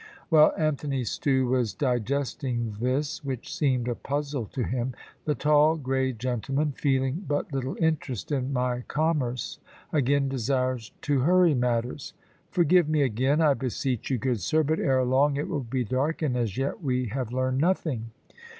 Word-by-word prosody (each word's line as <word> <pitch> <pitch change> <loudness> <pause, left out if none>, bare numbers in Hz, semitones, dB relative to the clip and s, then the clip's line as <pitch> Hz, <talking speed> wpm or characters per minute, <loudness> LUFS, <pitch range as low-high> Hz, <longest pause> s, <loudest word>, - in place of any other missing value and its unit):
While 155 -3 +6
Anthony 145 -4 -1
Stew 130 +2 +1
was 120 -6 +1
digesting 125 -2 -1
this, 140 +6 -1
which 130 -4 -5
seemed 130 -5 +1
a 120 - +1
puzzle 140 -2 -3
to 125 - -3
him, 125 +1 -2 0.3
the 150 - +1
tall 150 +1 +4
grey 130 -2 0
gentleman, 130 +5 -1
feeling 135 +4 0
but 145 0 -2
little 135 0 -2
interest 150 - -1
in 135 -2 -1
my 125 -1 0
commerce, 150 -6 -1 0.3
again 140 -1 +2
desired 130 -2 -1
to 145 -2 +1
hurry 175 +4 +4
matters. 125 +1 -1 0.4
"Forgive 175 -2 +3
me 155 -2 +3
again, 130 +5 +1
I 150 -3 +5
beseech 130 -2 -2
you, 130 - +1
good 120 -2 -1
sir; 155 - +2
but 155 +2 0
ere 130 -1 +2
long 140 +3 +3
it 145 - -2
will 145 - -2
be 125 +1 -2
dark, 135 +8 -1
and 135 -5 +1
as 115 -6 -1
yet 135 +9 -2
we 130 -5 -1
have 125 0 -3
learned 130 +1 0
nothing." 150 -9 0
135 Hz, 160 wpm, -27 LUFS, 125-145 Hz, 0.4 s, While